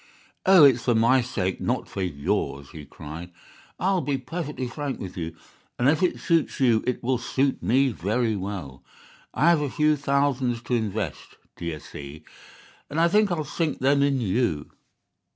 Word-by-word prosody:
"'Oh, 190 -4 +8
it's 130 -4 +6
for 120 - +3
my 120 +4 +4
sake, 95 -7 -2
not - - -1
for 95 - -5
yours,' 70 -4 -2
he 75 -2 -9
cried. 80 +5 -9 0.5
'I'll 190 0 +1
be 140 0 -1
perfectly 150 -1 -5
frank 140 +2 -4
with 95 -1 -7
you, 85 -3 -5 0.4
and 125 - +2
if 155 +4 +3
it 180 - +1
suits 165 -2 +1
you 120 -4 +3
it 125 - -1
will 125 0 +1
suit 135 +2 0
me 135 +3 +3
very 110 +2 -1
well. 95 -9 -6 0.5
I 160 +5 +4
have 165 -3 +3
a 145 - -1
few 150 +3 +2
thousands 135 -4 0
to 125 - -4
invest, 110 - -3 0.2
d'ye 85 -2 -4
see, 70 +1 -10 0.7
and 150 - -2
I 170 +1 +4
think 210 +1 +3
I'll 160 -3 0
sink 150 +1 -2
them 140 +2 +3
in 140 -1 +2
you. 100 -8 -1
125 Hz, 170 wpm, -25 LUFS, 95-145 Hz, 0.7 s, Oh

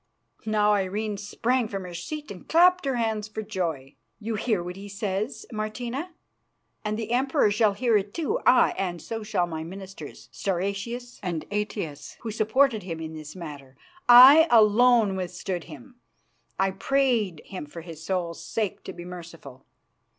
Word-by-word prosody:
Now 210 -1 +3
Irene 205 +2 -1
sprang 230 +4 0
from 195 -2 -5
her 180 -1 -8
seat 295 - -6
and 185 - -11
clapped 360 +1 +5
her 270 -2 0
hands 220 -3 -1
for 220 0 -6
joy. 170 -10 -3 0.3
"You 225 +1 -3
hear 215 -3 0
what 180 +1 -6
he 200 +1 -9
says, 200 +3 -3
Martina, 245 +9 -4 0.7
and 215 0 -2
the 225 0 -4
Emperor 265 -2 +2
shall 215 -1 +3
hear 235 +2 +1
it 200 0 -3
too; 340 - -1
aye, - - +5
and 175 -3 -2
so 225 +4 -5
shall 210 -4 0
my 160 -2 -5
ministers, 190 +3 -9
Stauracius 200 +6 -3
and 170 -5 -3
Aetius, 205 -8 -4
who 225 - -4
supported 220 +2 +2
him 170 -3 -6
in 160 0 -6
this 155 0 -9
matter. 145 -6 -9 0.3
I 270 +7 +10
alone 225 -1 +5
withstood 180 -1 -4
him; 250 0 -13 0.6
I 195 0 +2
prayed 225 - 0
him 185 -7 -7
for 170 +3 -9
his 165 -2 -10
soul's 175 -2 -3
sake 215 -4 -3
to - - -6
be 175 0 -9
merciful. 165 -7 -11
205 Hz, 160 wpm, -26 LUFS, 180-235 Hz, 0.7 s, I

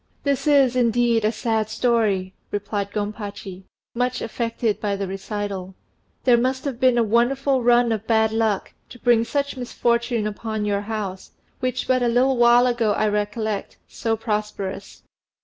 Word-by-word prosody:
"This 280 +1 0
is, 275 -4 +4
indeed, 235 -2 +2
a 215 - +2
sad 220 -1 -1
story," 220 -5 +1 0.2
replied 205 0 -3
Gompachi, 205 -2 -6 0.3
much 250 +1 -1
affected 230 -1 -2
by 205 -1 0
the 195 0 -3
recital. 195 -1 -5 0.5
"There 240 -2 +5
must 260 +2 -1
have 265 -4 -3
been 255 -2 +4
a 235 - +4
wonderful 255 +4 +2
run 240 0 +4
of 220 -1 -3
bad 220 -1 +3
luck 220 -3 0 0.2
to - - -11
bring 235 -1 +3
such 280 +3 -2
misfortune 235 -2 0
upon 215 0 -3
your 200 -1 0
house, 205 -3 -5 0.3
which 255 -1 -2
but 255 -1 +2
a 245 - +2
little 250 +2 +2
while 240 +1 +6
ago 235 -4 +1
I 215 - +1
recollect 210 0 -2
so 225 -1 -2
prosperous. 210 -3 -4
225 Hz, 155 wpm, -23 LUFS, 210-245 Hz, 0.5 s, while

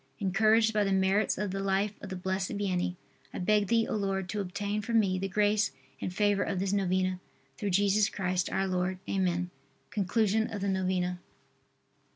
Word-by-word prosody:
Encouraged 220 +4 +3
by 210 -1 +3
the 195 - 0
merits 190 +2 +2
of 205 -1 -2
the 195 - -3
life 195 +1 0
of 205 - -7
the 190 - -4
Blessed 190 +1 -2
Vianney, 180 -3 -1 0.4
I - - -7
beg 210 +2 +2
Thee, 230 +1 +3
O - - -2
Lord, 195 -2 -1
to 210 - -2
obtain 205 +3 -3
for 230 +3 -4
me 195 -4 +3
the 195 - -2
grace 205 +2 +2 0.3
and - - -2
favor 205 +1 +2
of 195 - -1
this 190 +1 0
novena, 185 -1 +1 0.4
through 205 - -1
Jesus 200 +2 +3
Christ, 185 -2 -1
our 195 - +1
Lord. 185 0 -1
Amen. 180 -2 0 0.4
_Conclusion 215 +1 +1
of 205 - -4
the 200 - 0
Novena. 185 -1 0
195 Hz, 185 wpm, -30 LUFS, 185-205 Hz, 0.4 s, Encouraged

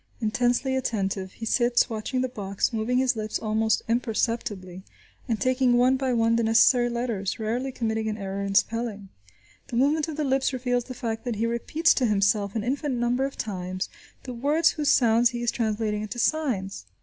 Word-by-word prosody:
Intensely 245 +4 +1
attentive, 195 -7 -2
he 225 - -7
sits 240 +1 +2
watching 230 +3 -3
the 255 - 0
box, 200 -3 -2
moving 225 +3 0
his 255 -1 +2
lips 215 -1 -3
almost 220 0 0
imperceptibly, 225 -5 -2 0.5
and 225 -3 -1
taking 255 -1 +2
one 255 +2 +4
by 265 -1 -1
one 230 -1 +2
the - - +2
necessary 225 +2 +4
letters, 235 -5 -2
rarely 235 +5 -2
committing 220 -2 -2
an 215 - -3
error 195 -1 -4
in 200 0 -3
spelling. 220 -3 0 0.6
The - - -6
movement 290 +5 +2
of 315 -2 -6
the 305 - 0
lips 265 -1 +1
reveals 245 -1 -1
the 255 - -8
fact 225 -3 -4
that 240 -2 -2
he 220 +2 -1
repeats 270 +8 +2
to 255 - +1
himself 200 0 +1
an 220 - -1
infinite 270 +2 -1
number 240 +2 +1
of 275 - -6
times 185 -2 -4 0.3
the 255 - -6
words 295 +7 +2
whose 300 -2 -1
sounds 235 -2 +4
he 240 -1 -5
is 235 - +1
translating 215 -2 -1
into 215 +3 -6
signs. 230 - -1
235 Hz, 185 wpm, -25 LUFS, 215-255 Hz, 0.6 s, one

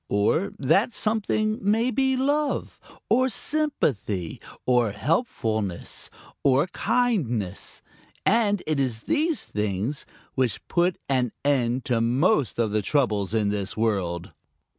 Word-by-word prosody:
Or 105 - +2
that 195 - +2
something 215 0 0
may 225 +5 +2
be 265 0 +2
love 285 +3 0 0.3
or 255 +3 +3
sympathy 140 - -1 0.2
or 120 -4 +3
helpfulness 110 - -1 0.3
or 140 +2 +4
kindness, 150 - -1 0.4
and 205 -2 +3
it 155 -2 0
is 125 -5 -1
these 315 - 0
things 105 +6 -2 0.3
which 130 -4 -1
put 175 0 +1
an 125 -4 +1
end 130 -2 +1
to 120 -5 +1
most 135 - +2
of 115 -3 +1
the 110 0 +1
troubles 110 -5 +1
in 105 -2 +2
this 100 -1 -2
world. 95 -6 -1
135 Hz, 120 wpm, -25 LUFS, -, 0.4 s, or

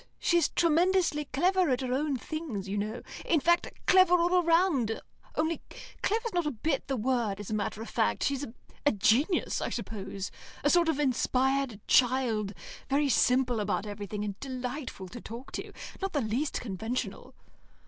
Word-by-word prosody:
She's 340 -3 +2
tremendously 335 -2 +2
clever 360 +6 +2
at 255 0 +1
her 255 -1 -1
own 285 0 0
things, 250 - -5
you 195 - -3
know; 210 +3 -3 0.2
in 325 - +2
fact, 345 +4 +2
clever 370 -1 +6
all 355 +1 +3
round, 330 - +2 0.4
only 320 +1 0 0.4
clever's 455 +1 0
not 350 -3 +1
a - - +2
bit 275 +3 -2
the 270 -2 -1
word 230 -4 0
as 205 +1 -6
a - - -1
matter 215 +1 -2
of - - -9
fact. 225 - +1
She's 280 0 0 0.4
a 290 - +4
genius, 240 - +2
I - - -1
suppose 195 -2 -5 0.3
a 290 - +4
sort 345 -2 +4
of 320 - +1
inspired 265 -3 +1
child, 235 -6 +3 0.3
very 280 +1 +2
simple 250 -1 +3
about 205 0 -1
everything, 205 0 -5
and 200 -1 -5
delightful 255 -5 -5
to 240 +5 -9
talk 235 +4 -9
to. - - -5 0.3
Not 390 0 -2
the 290 - +1
least 245 +7 -1
conventional." 225 +2 -4
265 Hz, 165 wpm, -29 LUFS, 220-320 Hz, 0.4 s, clever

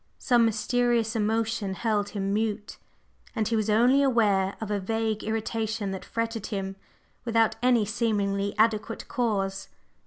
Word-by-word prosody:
Some 240 -3 +3
mysterious 230 +1 +1
emotion 220 -2 0
held 210 -1 0
him 195 -1 -2
mute, 210 -1 -2 0.6
and 220 -3 0
he 230 - 0
was 215 -1 0
only 245 +6 +4
aware 205 -7 +2
of 220 -2 -5
a 205 - 0
vague 220 +2 -2
irritation 220 -1 -2
that 190 - -5
fretted 230 -2 -3
him 195 -1 -4 0.5
without 230 -2 +2
any 245 -3 +3
seemingly 200 -2 -1
adequate 220 0 +1
cause. 195 -5 -1
220 Hz, 135 wpm, -27 LUFS, 205-230 Hz, 0.6 s, only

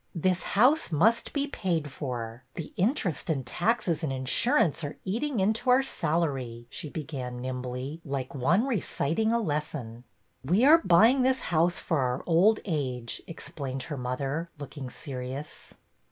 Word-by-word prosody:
This 180 +2 +1 0.2
house 260 - +4
must 215 +10 +3
be 285 -1 0
paid 170 - -2
for. 120 -4 -5
The 165 -3 -6
interest 190 - 0
and 135 -5 0
taxes 175 - 0
and 155 -5 -1
insurance 145 - +2
are 145 - -5
eating 235 +6 -1
into 220 +6 +1
our 255 +2 +6
salary," 140 - -1
she 150 - -5
began 135 -5 -5
nimbly, 130 +4 -5
like 135 -3 -4
one 170 - +2
reciting 220 - 0
a 235 - +3
lesson. 145 - -3 0.4
"We 185 - +3
are 325 +3 +8
buying 225 +10 +6
this 260 +1 +2
house 170 +2 +3
for 160 -4 -1
our 125 -1 -1
old 190 +6 +4
age," 130 - -2
explained 135 -5 -6
her 145 +2 -5
mother, 135 +6 -3
looking 145 -2 -7
serious. 135 +2 -7
155 Hz, 145 wpm, -28 LUFS, 130-200 Hz, 0.4 s, are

